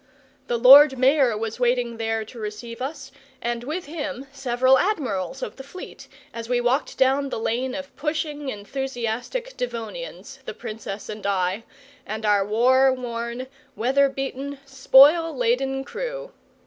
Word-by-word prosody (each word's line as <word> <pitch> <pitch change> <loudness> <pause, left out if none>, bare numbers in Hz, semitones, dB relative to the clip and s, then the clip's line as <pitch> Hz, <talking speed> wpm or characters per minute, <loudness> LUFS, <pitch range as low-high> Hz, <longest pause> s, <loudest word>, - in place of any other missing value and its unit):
The 240 - 0
Lord 265 +3 +8
Mayor 260 -3 +3
was 225 +2 -4
waiting 245 -1 +1
there 225 -1 -2
to 235 +2 -12
receive 225 +3 -7
us, 270 0 -6 0.3
and 240 0 -3
with 315 +8 -4
him 290 -3 -5
several 260 -1 +2
Admirals 255 - -2
of - - -6
the 270 - -8
Fleet, 365 +7 -11 0.3
as 230 0 -7
we 245 -1 +2
walked 245 +4 0
down 270 +1 +2
the - - -3
lane 245 +3 -2
of 280 -1 -8
pushing, 300 -1 -3
enthusiastic 250 - -4
Devonians, 245 - -6
the - - -6
Princess 215 -2 -7
and 215 -1 -7
I, 190 +2 -1 0.4
and 215 +1 -5
our 205 -1 +3
war 255 +6 +4
worn, 240 -1 -4 0.3
weather 270 +4 +2
beaten, 270 +1 -5
spoil 280 +4 +5
laden 265 +3 0
crew. - - -6
255 Hz, 145 wpm, -24 LUFS, 230-280 Hz, 0.4 s, Lord